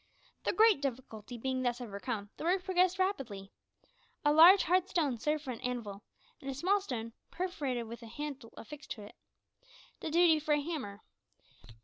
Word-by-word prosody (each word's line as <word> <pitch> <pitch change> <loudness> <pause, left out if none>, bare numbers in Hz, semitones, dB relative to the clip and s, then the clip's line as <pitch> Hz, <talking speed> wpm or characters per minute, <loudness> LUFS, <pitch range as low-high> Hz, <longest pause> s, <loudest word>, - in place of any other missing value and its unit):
The - - +2
great 435 -8 +5
difficulty 245 -3 -5
being 260 +2 -2
thus 245 -1 0
overcome, 205 -2 -5
the - - -7
work 360 +2 +1
progressed 370 0 +2
rapidly. 265 - -2 0.7
A 295 - +5
large 345 +5 +9
hard 370 +2 +2
stone 290 - 0
served 300 +4 -1
for 265 - -4
an 235 - -7
anvil, 230 -5 -4 0.4
and 275 - -6
a 270 - -3
small 385 +8 +2
stone, 230 - -5 0.2
perforated, 295 -10 -3
with 235 +1 -9
a 230 - -10
handle 275 -1 -7
affixed 300 +6 -10
to 210 - -11
it, 205 - -12 0.9
did 315 - -5
duty 335 -2 +5
for 300 0 +1
a - - +1
hammer. 285 -11 -5
275 Hz, 170 wpm, -32 LUFS, 235-345 Hz, 0.9 s, large